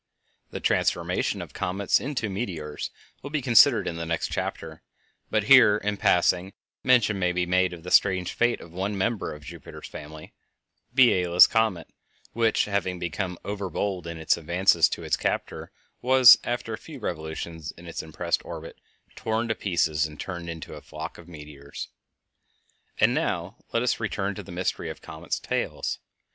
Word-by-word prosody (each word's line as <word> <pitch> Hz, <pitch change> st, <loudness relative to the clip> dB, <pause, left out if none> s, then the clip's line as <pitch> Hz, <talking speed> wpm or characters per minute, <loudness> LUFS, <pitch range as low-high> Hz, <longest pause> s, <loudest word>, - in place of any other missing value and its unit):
The -, -, -6 dB
transformation -, -, 0 dB
of -, -, -13 dB
comets 95 Hz, +2 st, +1 dB
into 130 Hz, -5 st, -3 dB
meteors 90 Hz, -8 st, -4 dB, 0.3 s
will 140 Hz, -, -7 dB
be 155 Hz, +1 st, -1 dB
considered 120 Hz, -4 st, +5 dB
in 85 Hz, -, -3 dB
the 85 Hz, -, -4 dB
next 85 Hz, -1 st, -2 dB
chapter, -, -, -4 dB, 0.5 s
but 110 Hz, -, +1 dB
here, 110 Hz, -3 st, +7 dB
in 105 Hz, 0 st, -2 dB
passing, 90 Hz, +1 st, +2 dB, 0.3 s
mention 120 Hz, -6 st, +3 dB
may 90 Hz, -1 st, +1 dB
be 90 Hz, 0 st, 0 dB
made 90 Hz, +1 st, +2 dB
of 85 Hz, -2 st, -10 dB
the 90 Hz, -, -7 dB
strange 95 Hz, -3 st, +3 dB
fate 120 Hz, 0 st, +1 dB
of 85 Hz, -, -12 dB
one 95 Hz, +3 st, -3 dB
member 115 Hz, +3 st, -1 dB
of 75 Hz, 0 st, -10 dB
Jupiter's 70 Hz, -, -10 dB
family, 75 Hz, +1 st, -10 dB, 0.6 s
Biela's 90 Hz, -9 st, +6 dB
comet, 110 Hz, -8 st, 0 dB, 0.5 s
which, 115 Hz, -1 st, +2 dB
having 100 Hz, -3 st, -1 dB
become 90 Hz, +1 st, -3 dB
over 100 Hz, -2 st, -4 dB
bold 95 Hz, -3 st, -3 dB
in 85 Hz, -1 st, -6 dB
its 80 Hz, +1 st, +1 dB
advances 85 Hz, 0 st, +3 dB
to -, -, -5 dB
its -, -, +1 dB
captor, -, -, -3 dB, 0.3 s
was, 130 Hz, -1 st, +8 dB
after 120 Hz, -2 st, -3 dB
a -, -, -5 dB
few 155 Hz, -3 st, -10 dB
revolutions 80 Hz, -, -5 dB
in 85 Hz, -, -14 dB
is 85 Hz, -, -5 dB
impressed 80 Hz, +2 st, -2 dB
orbit, -, -, -9 dB, 0.3 s
torn 110 Hz, +1 st, -1 dB
to -, -, +2 dB
pieces 80 Hz, -6 st, 0 dB
and 75 Hz, -1 st, -13 dB
turned 85 Hz, -3 st, -6 dB
into 80 Hz, -1 st, -7 dB
a -, -, -9 dB
flock -, -, -8 dB
of 85 Hz, -, -14 dB
meteors. 75 Hz, -3 st, -9 dB, 1.1 s
And -, -, +4 dB
now 90 Hz, +6 st, -2 dB
let 115 Hz, -, +1 dB
us 125 Hz, -, 0 dB
return 100 Hz, -3 st, -2 dB
to -, -, -7 dB
the 100 Hz, -, -12 dB
mystery 90 Hz, +1 st, -2 dB
of -, -, -8 dB
comets' 80 Hz, +1 st, -5 dB
tails. -, -, -3 dB
90 Hz, 170 wpm, -26 LUFS, 85-110 Hz, 1.1 s, was